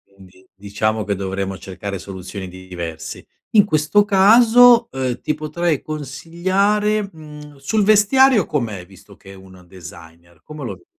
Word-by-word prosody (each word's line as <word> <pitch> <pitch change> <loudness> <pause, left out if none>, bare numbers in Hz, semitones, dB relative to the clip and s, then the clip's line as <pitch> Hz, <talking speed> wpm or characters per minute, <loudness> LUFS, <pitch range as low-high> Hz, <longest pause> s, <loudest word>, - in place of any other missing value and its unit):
Quindi 95 -1 -19
diciamo 105 +2 -2
che 100 -1 -2
dovremo 95 0 -4
cercare 100 +1 -7
soluzioni 95 0 -8
di 95 +1 -13
diverse. 85 -3 -7 0.3
In 210 -2 +5
questo 155 +4 +2
caso, 235 +4 +5
uhm, 130 -2 -3
ti 150 - -1
potrei 155 +1 -2
consigliare, 185 +9 -1
mhmm, 150 -2 -13
sul 205 +11 -1
vestiario 215 +2 +4
com'è, 110 - -4
visto 95 +2 -18
che 95 - -15
è - - -12
un 95 -1 -16
designer? 85 -2 -14
Come 150 -1 -10
lo - - -5
vedi? 370 - -18
135 Hz, 145 wpm, -19 LUFS, -, 0.3 s, In